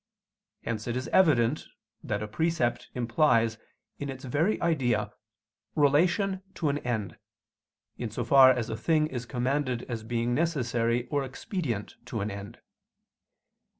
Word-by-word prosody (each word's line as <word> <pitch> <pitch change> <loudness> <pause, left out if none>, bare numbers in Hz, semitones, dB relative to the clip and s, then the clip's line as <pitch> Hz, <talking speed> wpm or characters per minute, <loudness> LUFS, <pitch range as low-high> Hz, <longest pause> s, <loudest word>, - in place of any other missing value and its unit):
Hence 110 -1 -3
it 120 +1 -1
is 130 - -3
evident 145 -7 +3 0.4
that 105 0 -2
a - - -4
precept 160 +1 -1
implies, 115 -2 +2 0.4
in 140 - -4
its 130 -1 -7
very 155 - +1
idea, 120 -11 +1 0.6
relation 175 +7 +3
to 155 - 0
an 145 +1 0
end, 110 -7 -3 0.8
in 120 - -3
so 115 +3 -3
far 130 +2 +8
as 125 -3 +1
a - - -2
thing 155 -2 +2
is 125 -5 -5
commanded 130 0 -1
as 120 -3 -5
being 120 +1 -1
necessary 120 -6 0
or 145 -2 0
expedient 135 - -4
to 110 - -4
an 105 +1 -2
end. 100 +3 -8
125 Hz, 140 wpm, -28 LUFS, 115-150 Hz, 0.8 s, far